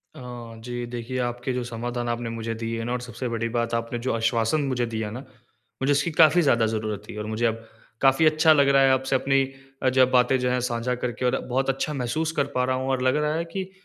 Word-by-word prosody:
अ, - - -10 0.4
जी, 120 0 -4
देखिए 120 +1 -5
आपके 120 +2 -3
जो 125 0 -2
समाधान 120 0 -4
आपने 120 0 -2
मुझे 115 0 -4
दिए 115 0 -3
ना, 120 - -3
और 125 - -2
सबसे 125 +1 -5
बड़ी 115 0 -2
बात 115 0 -1
आपने 115 +1 -2
जो 130 +2 -1
आश्वासन 115 +5 +1
मुझे 130 -3 0
दिया 110 -2 -3
ना, 120 - -6 0.6
मुझे 140 +2 +2
उसकी 150 +4 +1
काफ़ी 160 +2 +5
ज़्यादा 120 -6 +3
ज़रूरत 110 -2 -3
थी। - - -7
और 105 - -4
मुझे 110 +2 -1
अब 115 0 -1 0.4
काफ़ी 135 +3 +4
अच्छा 155 +1 +5
लग 140 -2 +4
रहा 135 0 +5
है 135 0 +5
आपसे 130 +1 +1
अपनी 135 +1 +2 0.4
अ, 130 - +4
ज 130 0 +4
बातें 125 +1 +4
जो 125 0 0
हैं 125 0 +1
साझा 120 +1 -1
करके, 125 0 -3
और 125 - +2
बहुत 130 +2 0
अच्छा 135 +3 -1
महसूस 150 +5 -1
कर - - -1
पा 125 - +2
रहा 130 0 0
हूँ। 130 +1 -2
और 130 - 0
लग 130 +1 +3
रहा 150 0 +1
है 170 +1 -1
कि 190 -1 -3
125 Hz, 245 wpm, -25 LUFS, 115-135 Hz, 0.6 s, काफ़ी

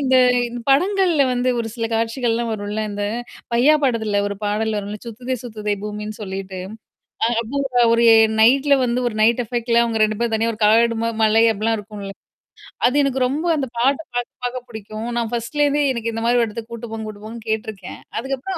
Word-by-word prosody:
இந்த 260 -2 +3 0.5
படங்கள்ல 355 +1 +3
வந்து 250 +1 0
ஒரு 230 - -2
சில 230 -2 -2
காட்சிகள்லாம் 230 0 0
வரும்ல. 210 0 -3
இந்த 205 0 -3 0.5
பையா 255 +6 +5
படத்துல 220 -6 +1
ஒரு 200 - -3
பாடல் 215 +1 0
வரும்ல. 205 +1 -5
சுத்ததே 245 +3 -4
சுத்ததே 210 -3 -3
பூமின்னு 210 0 -6
சொல்லிட்டு. 190 -1 -6 0.8
அப்போ 250 0 +1
ஒரு 235 0 +3 0.4
நைட்ல 275 +5 +5
வந்து 245 +1 0
ஒரு 215 - -8
நைட் 235 +3 +4
எஃபெக்ட்ல, 235 0 +1
அவங்க 225 -2 -1
ரெண்டு 215 -1 0
பேரும் 230 -2 +1
தனியா 230 +1 +1
ஒரு 215 - -12
காடு 230 +2 +4
மாரி, 230 -1 -2
மலை 220 +1 +4
அப்பிடிலாம் 220 +2 0
இருக்கும்ல. 205 -1 -8 0.7
அது 250 - -1
எனக்கு 265 -2 +1
ரொம்ப 300 +6 -2
அந்தப் 265 -5 -4
பாட்டப் 275 +5 +1
பாக்க, 245 0 -1 0.2
பார்க்கப் 250 0 -4
பிடிக்கும். 220 +1 -7
நான் 230 -1 -1
பர்ஸ்ட்ல 265 +6 0
இருந்தே 290 +1 +1
எனக்கு 230 -1 -3
இந்த 225 - -3
மாரி 240 +1 +3
ஒரு 230 - +1
இடத்துக்கு 225 +2 -8
கூட்டிட்டு 235 -1 -7
போங்க, 220 -1 -5
கூட்டிட்டு 210 0 -10
போங்கன்னு 225 0 -9
கேட்டுருக்கேன். 215 -3 -5 0.2
அதுக்கப்புறம் 270 +9 -3
230 Hz, 180 wpm, -21 LUFS, 215-250 Hz, 0.8 s, பையா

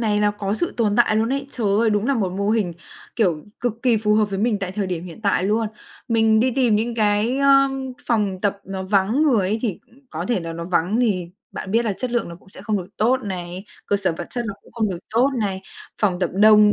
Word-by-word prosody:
này 210 -2 +1
là 210 0 +3
có 205 -1 -3
sự 345 +9 -2
tồn 210 -3 +1
tại 235 -3 +4
luôn 220 +1 +2
ấy. 275 0 -2
Trời 235 -6 -2
ơi! 230 -1 +3
Đúng 210 +1 +1
là 275 - +2
một 195 -7 -1
mô 200 +2 -1
hình, 215 -6 +1 0.4
kiểu, 175 -9 +1 0.2
cực 235 -1 -2
kỳ 245 -3 +4
phù 210 0 +2
hợp 215 0 +4
với 195 - -2
mình 215 0 +1
tại 190 -2 -4
thời 200 0 -2
điểm 180 -2 -3
hiện 180 +4 -10
tại 200 -3 +2
luôn. 220 +3 +1 0.4
Mình 225 -1 +4
đi 255 +3 +3
tìm 245 -4 +2
những 230 +2 -1
cái, 215 +3 +1
ờm, 275 -1 +3
phòng 205 -5 0
tập 200 0 0
nó 190 0 -5
vắng 200 +8 +2
người 230 -11 +3
ấy, 215 +3 0
thì, 210 -7 -1
ừ, - - -30 0.2
có 160 +2 -4
thể 235 -6 +1
là 165 -1 -5
nó 170 0 -5
vắng 180 +4 +1
thì 195 -8 +1 0.3
bạn 190 - -6
biết 230 +3 +2
là 215 - 0
chất 250 +6 -4
lượng 240 -5 -1
nó 170 - -8
cũng 190 - -22
sẽ 190 - -12
không 210 0 0
được 180 - -6
tốt 235 +5 +3
này, 180 -1 -5 0.2
cơ 205 - +2
sở 195 -4 0
vật - - -5
chất 240 -1 -3
nó 200 - -4
cũng - - -20
không 225 -2 0
được 180 - -4 0.2
tốt 245 +4 +4
này. 195 -3 -2 0.4
Phòng 190 -4 +2
tập 180 - 0
đông 210 +1 +6
210 Hz, 260 wpm, -22 LUFS, 190-230 Hz, 0.4 s, đông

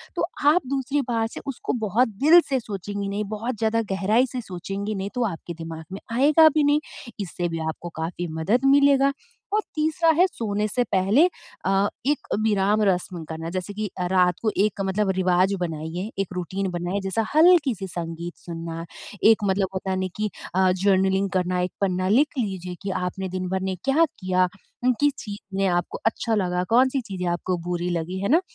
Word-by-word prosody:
तो - - +1 0.2
आप 355 +4 +4
दूसरी 275 +1 0
बात 225 -2 0
से - - -6
उसको 270 - -3
बहुत 240 +6 +3 0.2
दिल 330 +4 +9
से 265 -2 +1
सोचेंगी 200 -2 -5
नहीं 205 +1 -2
बहुत 225 +2 -3
ज़्यादा 225 +1 +1
गहराई 210 +6 +3
से 255 - -3
सोचेंगी 200 +2 -5
नहीं 195 +1 -3
तो 245 - +1
आपके 170 +1 -7
दिमाग 165 -1 -7
में 195 - -5 0.2
आएगा 305 +4 +6
भी 305 0 +1
नहीं। 290 +1 +4 0.4
इससे 175 -2 -3
भी 165 0 -3
आपको 175 +2 -6
काफ़ी 175 +2 -3
मदद 230 +11 +1
मिलेगा 280 -1 +4 0.4
और 430 - +3
तीसरा 320 +2 +2
है 360 - +6
सोने 210 - -2
से 245 +4 0
पहले 200 - +3 0.4
अ, 195 +1 +3 0.2
एक 290 +2 0
विराम 210 -1 +2
रस्म 180 -3 0
करना 160 +1 -5
जैसे 185 +3 -4
कि 210 0 -3 0.2
रात 180 -2 +4
को 220 - +1
एक 210 -1 -2
मतलब 195 +1 0
रिवाज़ 185 +1 +3
बनाइए, 165 +4 -3
एक 195 - 0
रूटीन 185 +2 -3
बनाए 175 +3 -2
जैसा 195 +4 -1
हल्की-सी 295 - +5
संगीत 170 0 -5
सुनना 165 -1 -5 0.5
एक 220 -1 +1
मतलब 195 0 +1
होता 190 0 -3
है 185 - 0
ना 185 - -1
कि 215 0 -1 0.3
अ, 185 -1 +4
जर्नलिंग 195 0 +3
करना 180 0 0
एक 180 - -1
पन्ना 185 -1 +1
लिख 280 +6 +3
लीजिए 185 -5 -3
कि 200 - -3
आपने 185 +1 -3
दिन 185 0 -3
भर 190 0 0
में 190 0 -1
क्या 295 +5 +4
किया, 185 - 0 0.4
उम, 255 - +5
किस 290 -1 +3
चीज़ 205 -2 -8
में 195 - +2
आपको 175 -1 -1
अच्छा 225 0 +1
लगा 180 -3 0
कौन-सी 260 +2 +4
चीज़ें 190 -5 -5
आपको 175 +1 -1
बुरी 175 0 -1
लगी 180 +3 -4
है 200 - -1
ना। 325 +6 +5
195 Hz, 190 wpm, -24 LUFS, 180-235 Hz, 0.5 s, दिल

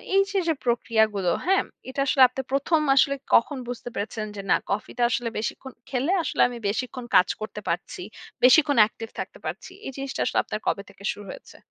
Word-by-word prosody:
এইযে 390 0 +2
যে 325 - +3
প্রক্রিয়াগুলো, 220 -6 +2
হ্যাঁ? 385 +1 +3 0.3
এটা 260 - -6
আসলে 265 - +3
আপনি 260 +2 -4
১ম 280 +4 +2 0.2
আসলে 280 +1 +4 0.2
কখন 270 +4 +3
বুঝতে 245 0 -6
পেরেছেন 215 +1 -3
যে 200 - -5
না - - +6
কফিটা 210 +4 -2
আসলে 245 -1 -1
বেশিক্ষণ 255 +4 -4 0.2
খেলে 270 +6 0
আসলে - - -1
আমি 240 - -7
বেশিক্ষণ 250 +4 -3
কাজ 180 - +7
করতে 210 -1 -6
পারছি। 170 +1 -3 0.4
বেশিক্ষণ 285 +3 +6
অ্যাকটিভ 220 +1 0
থাকতে - - -6
পারছি। - - -5
এই - - -4
জিনিসটা 275 0 -4
আসলে - - -1
আপনার 215 - -4
কবে 200 - 0
থেকে 200 - -16
শুরু 205 - -9
হয়েছে? - - -12
245 Hz, 185 wpm, -25 LUFS, 215-275 Hz, 0.4 s, কাজ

